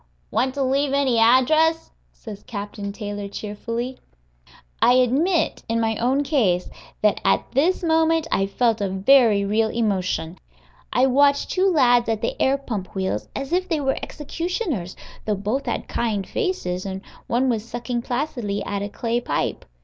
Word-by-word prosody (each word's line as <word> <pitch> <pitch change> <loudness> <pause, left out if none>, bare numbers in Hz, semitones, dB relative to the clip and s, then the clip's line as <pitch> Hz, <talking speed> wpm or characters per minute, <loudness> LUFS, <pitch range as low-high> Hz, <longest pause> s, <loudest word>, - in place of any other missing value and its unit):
"Want 255 +4 0
to 280 - 0
leave 275 +1 +1
any 270 -4 +2
address?" 310 +8 +4 0.2
says 210 -4 -10
Captain 205 -1 -5
Taylor, 205 -1 -5
cheerfully. 230 +5 -5 0.8
I 245 - +6
admit, 275 +8 +2
in 230 0 +1
my 225 -1 0
own 265 +4 +1
case, 215 - +1 0.3
that 210 - +3
at - - +2
this 325 +9 +1
moment 325 -1 +2
I 195 - +1
felt 225 +1 +1
a 200 - 0
very 205 +1 +4
real 220 +2 +1
emotion. 185 -6 -1 0.5
I 250 - +3
watched 280 +2 +3
two 385 +1 +2
lads 245 -8 +4
at 220 -1 -1
the - - -1
air 270 +1 +3
pump 215 -10 -6
wheels 190 - -2
as 275 +4 -4
if 370 +1 0
they 320 -3 +1
were 270 -2 0
executioners, 310 - -4 0.3
though 210 - 0
both 210 +8 -2
had - - -2
kind 215 -5 -1
faces, 190 - -2
and 190 -1 -5 0.3
one 250 +3 +1
was 225 -4 0
sucking 240 +1 -4
placidly 240 -6 -3
at 200 -1 -3
a 205 - -3
clay 230 +3 -1
pipe. - - -2
240 Hz, 160 wpm, -23 LUFS, 205-280 Hz, 0.8 s, I